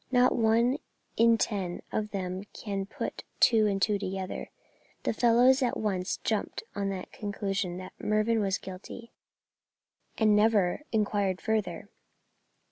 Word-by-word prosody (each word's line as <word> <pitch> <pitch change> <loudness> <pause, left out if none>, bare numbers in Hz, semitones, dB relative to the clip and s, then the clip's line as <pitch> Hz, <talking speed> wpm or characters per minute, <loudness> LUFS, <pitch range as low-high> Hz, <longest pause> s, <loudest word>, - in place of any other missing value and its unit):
Not 250 0 +4
one 235 +4 +3 0.4
in 230 0 +5
ten 195 -6 -2
of 215 -1 -1
them 190 -1 -4
can 195 -2 -4
put - - -5 0.2
two 220 -3 +5
and 195 -1 0
two 205 +2 +2
together. 190 -1 -4 0.5
The - - 0
fellows 245 +4 +5
at 250 - +1
once 190 -4 -1
jumped - - -1
to - - -6
the 195 -2 -3
conclusion 200 -3 -3
that 185 0 -8
Mervyn 215 +2 +2
was 195 -2 +1
guilty, 190 +5 -9 1.1
and 215 -2 +4
never 210 -1 +3
inquired 205 -3 +1
further." 205 -5 -2
210 Hz, 130 wpm, -29 LUFS, 195-225 Hz, 1.1 s, in